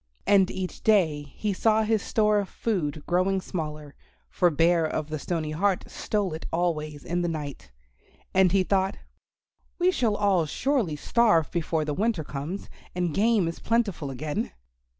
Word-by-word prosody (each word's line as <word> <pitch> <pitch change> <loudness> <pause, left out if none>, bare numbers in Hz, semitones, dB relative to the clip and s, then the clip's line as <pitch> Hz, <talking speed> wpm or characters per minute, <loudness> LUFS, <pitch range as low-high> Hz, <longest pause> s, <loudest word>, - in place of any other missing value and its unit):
And 195 -2 +5
each 185 -1 -5
day 175 -9 +3
he 210 -2 -1
saw 220 +3 +3
his 220 -1 +1
store 210 -1 +2
of 200 - -3
food 155 -9 -2
growing 185 +2 +1
smaller, 150 -5 -5 0.4
for 180 - +3
Bear 165 +2 +3
of 155 -1 -2
the 155 -1 -3
Stony 160 -1 -2
Heart 190 +4 +1
stole 205 -5 -1
it 160 - -6
always 155 -4 -1
in 175 +1 -1
the 175 - 0
night. 145 - -5 0.6
And 190 -2 +5
he 195 0 +3
thought, 190 0 +1 0.8
"We 360 +1 +3
shall 235 - +1
all 195 -6 +2
surely 245 - 0
starve 170 -1 +2
before 160 -2 -1
the 150 - -2
winter 205 -1 0
comes, 150 +7 -5 0.3
and 175 -3 -1
game 210 -1 +3
is 165 - -5
plentiful 210 -10 0
again." 145 +3 -3
180 Hz, 160 wpm, -26 LUFS, 155-205 Hz, 0.8 s, And